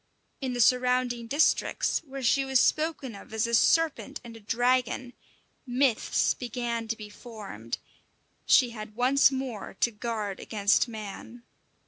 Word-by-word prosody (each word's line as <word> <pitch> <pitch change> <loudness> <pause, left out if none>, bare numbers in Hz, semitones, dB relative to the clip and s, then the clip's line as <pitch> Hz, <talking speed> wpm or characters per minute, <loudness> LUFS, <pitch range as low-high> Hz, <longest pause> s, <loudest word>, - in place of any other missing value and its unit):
In 260 -2 -2
the 245 - -4
surrounding 250 -1 +2
districts, 290 +6 +1
where 270 0 -7
she 275 +3 +3
was 265 -1 +2
spoken 305 -5 +1
of 200 - -12
as 220 - +1
a 235 - -4
serpent 290 +2 +2
and 235 -1 -10
a - - -11
dragon, 245 +3 0 0.5
myths 250 -1 +2
began 235 -2 -4
to 225 0 -2
be 215 - -8
formed; 210 - -8 0.7
she 250 -3 +5
had 215 -2 -9
once 260 +3 +4
more 260 -8 -5
to 235 - +1
guard 210 -3 -4
against 205 +2 +2
man. 220 +2 -8
240 Hz, 140 wpm, -28 LUFS, 220-260 Hz, 0.7 s, she